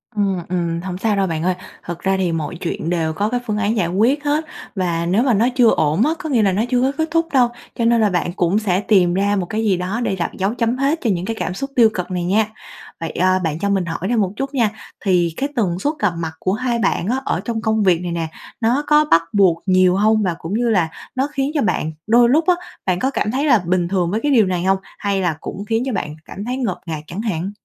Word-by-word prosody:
Ừm, 200 -3 +1
ừm, 170 -2 -1
hổng 180 -1 -5
sao 210 +1 0
đâu 195 -1 +1
bạn 160 -1 -2
ơi, 185 0 +1 0.3
thật 170 0 -6
ra 190 0 0
thì 180 -3 0
mọi 165 +1 -3
chuyện 165 -2 -3
đều 160 -2 0
có 205 +6 -1
cái 245 0 0
phương 210 -1 -1
án 215 +2 0
giải 175 -4 +1
quyết 235 - +1
hết 300 +2 0 0.3
và 170 -3 -1
nếu 195 +8 +2
mà 255 -4 +3
nó 225 +4 +3
chưa 240 -3 +5
ổn 155 - +2
á, 310 - +2
có 320 -4 -5
nghĩa 240 -5 +3
là 195 - +3
nó 205 +4 +1
chưa 250 -1 +2
có 265 +1 +2
kết 320 0 0
thúc 330 0 +2
đâu, 245 -3 +4 0.3
cho 230 - 0
nên 235 -1 +4
là 210 - +4
bạn 175 -1 -1
cũng 185 +3 +1
sẽ 190 -3 +1
tìm 185 -5 +3
ra 200 +2 +1
một 185 -3 -1
cái 220 +4 -2
gì 195 -4 +2
đó 185 +6 -2
để 195 - 0
đặt 170 - -2
dấu 195 +4 0
chấm 235 +1 0
hết 285 +5 +1
cho 230 - 0
những 180 -1 -1
cái 225 - -3
cảm 180 - -2
xúc 275 +7 -4
tiêu 230 -3 +6
cực 180 0 -4
này 180 -1 -1
nha. 205 +4 +2 0.5
Vậy, 165 -1 -4
ờ, 185 +1 +2
bạn 160 0 -2
cho 200 0 -1
mình 195 -3 +1
hỏi 165 0 -4
thêm 240 -2 +2
một 190 -1 0
chút 275 +2 -4
nha, 230 -5 +2 0.4
thì 175 -3 +2
cái 280 +2 -1
tần 185 -6 0
suất 295 +9 0
gặp 205 -4 +1
mặt 160 -1 -3
của 185 - 0
hai 235 +1 -1
bạn 190 -4 0
á 260 +3 0
ở - - 0
trong 230 -2 -2
công 220 -2 +1
việc 180 -3 +3
này 175 -1 -4
nè, 165 -1 -2 0.3
nó 245 +6 +2
có 300 0 +5
bắt 165 - +6
buộc 185 -5 +3
nhiều 185 -1 +4
hông? 215 +1 +3
Và 175 -3 0
cũng 165 +5 -5
như 235 +1 +1
là 180 -7 +2 0.3
nó 265 +2 +1
khiến 275 +1 -1
cho 290 - +1
bạn 170 -5 0 0.2
đôi 235 +1 +5
lúc 315 +5 +3
á, 360 - +5 0.3
bạn 180 -1 +1
có 265 +1 0
cảm 215 - -1
thấy 275 +4 0
là 240 -7 +5
bình 175 -1 +1
thường 180 -2 0
với 215 - 0
cái 290 - +2
điều 225 -6 +5
này 180 -1 -1
hông? 190 0 +3 0.2
Hay 200 -1 0
là 170 -4 0
cũng 200 +2 -6
khiến 225 +3 0
cho 260 - -2
bạn 150 -5 -3
cảm 200 +3 -7
thấy 250 +1 -2
ngột 200 -9 -2
ngạt 155 -2 -4
chẳng 185 +5 -5
hạn? 195 -3 -2
200 Hz, 280 wpm, -19 LUFS, 180-235 Hz, 0.5 s, tiêu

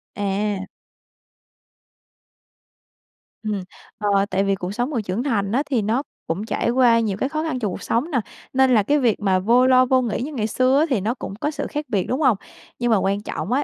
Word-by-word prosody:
À. 200 -1 -1 2.8
Ừm. 210 -3 -2 0.3
Ờ, 200 -2 +2
tại 195 -1 +1
vì 195 0 +1
cuộc 185 -1 -5
sống 245 +5 -1
người 255 -7 -1
trưởng 200 +4 -3
thành 205 -8 0
á, 265 +6 +1
thì 255 -5 +1
nó 225 +6 0 0.2
cũng 180 +6 -2
trải 230 - -1
qua 240 -1 +4
nhiều 210 -4 -1
cái 265 - -1
khó 310 +1 -2
khăn 310 -6 -2
trong 210 -5 -1
cuộc - - -6
sống 260 +9 -1
nè, 260 - +2 0.3
nên 265 -1 +4
là 215 -3 +4
cái 295 +8 +2
việc 240 -5 +2
mà 190 -2 +2
vô 235 +6 +4
lo 255 0 +6
vô 255 0 +3
nghĩ 235 -2 -2
như 295 +5 -4
ngày 220 -5 -1
xưa 255 +4 +2
á, 310 - +4
thì 250 -8 +1
nó 220 +5 0
cũng 240 - -7
có 290 +8 -2
sự 290 -1 -4
khác 300 0 -3
biệt, 195 -5 0
đúng 260 +5 -1
hông? 255 -8 +4 0.4
Nhưng 240 -1 +1
mà 220 - +5
quan 195 +1 0
trọng 200 -2 -5
á 275 +3 +2
230 Hz, 225 wpm, -22 LUFS, 200-260 Hz, 2.8 s, lo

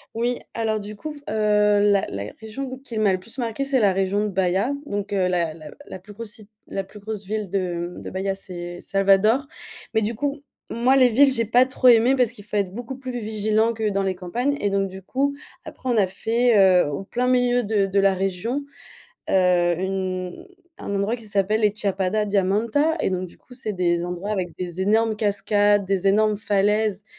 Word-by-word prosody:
Oui, 240 +2 0 0.2
alors 220 -1 -1
du 210 +1 -8
coup 305 +8 -6
f - - -11
heu, 210 -1 +3
la 205 -1 +3
la 100 0 -5
région 220 +5 -6
où 260 - -6
qu'il 250 -4 -6
m'a 210 -2 +3
le 185 - -1
plus 230 +8 -9
marquée 235 +3 -2
c'est 275 -1 +1
la 200 -4 +3
région 195 +2 0
de 210 - 0
Baya 190 +4 0
donc 205 -5 -4
la 180 -5 0
la 155 -2 -11 0.2
la - - -8
plus 205 +3 -14
grosse 225 +1 -8
si 215 -4 -11 0.2
la 195 - -3
plus 200 +2 -14
grosse 210 0 -6
ville 210 0 -3
de, 175 -2 -2
mmh, - - -8
de - - -7
Baya 195 +1 -2
c'est 175 -2 -7
Salvador 200 +8 +3 0.5
mais 220 - +3
du 215 +3 -1
coup 285 +4 -3 0.3
moi 245 +3 +2
les 255 -2 +6
villes 270 +4 +5
j'ai 230 -2 0
pas 245 +4 +4
trop 260 0 +1
aimé 240 +2 +6
parce 250 -3 +2
qu'il 210 -4 -13
faut 210 - -3
être 195 -3 0
beaucoup 245 +3 -6
plus 255 -1 -6
vigilant 215 +1 0
que 220 -1 -1
dans 195 -1 0
les 190 -1 0
campagnes 240 +11 -2
et 205 - +1
donc 195 0 0
du 190 0 -10
coup 275 +8 -1 0.3
après 260 - -7
on 240 - +2
a 205 - +5
fait, 230 +5 +1 0.3
heu, - - -3
au 145 - -4
plein 245 +5 -2
milieu 245 -1 +2
de 205 -2 +1
de 195 +1 +1
la 195 0 +4
région, 195 +8 -2 0.7
heu, 180 -2 +3
une 185 -1 -3 0.3
un - - -5
endroit 200 +3 0
qui 230 - -12
s'appelle 210 +1 0
les 210 -2 +3
Chapada 200 0 0
Diamantina 215 - +1
et - - +1
donc 185 0 -2
du - - -20
coup 250 - -17
c'est 245 -4 -4
des 175 -3 0
endroits 180 +4 -4
avec 185 -4 -2
des 180 0 -4
énormes 220 +3 +2
cascades, 205 -1 +2
des 195 0 +1
énormes 215 +1 +3
falaises. 205 0 0
205 Hz, 215 wpm, -23 LUFS, 190-230 Hz, 0.7 s, les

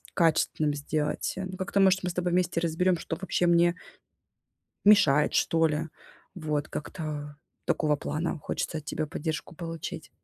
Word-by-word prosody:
качественным 155 -3 +2
сделать, 150 +1 -2
ну, 185 0 -4
как-то 190 +1 -1
может 190 0 +5
мы 180 - 0
с - - -9
тобой 180 0 0
вместе 180 -1 +1
разберём, 175 +2 +2
что 165 - -4
вообще 180 -1 0
мне 170 0 +4 1.1
мешает, 150 -8 +6
что 165 0 +3
ли. 155 +1 -2 0.5
Вот, 150 -3 -2
как-то 150 -2 -5 0.3
такого 150 -2 +2
плана 160 +3 -3
хочется 160 - -3
от 150 - -16
тебя 155 -1 -2
поддержку 160 +1 -4
получить. 165 -1 -6
165 Hz, 145 wpm, -28 LUFS, 150-180 Hz, 1.1 s, мешает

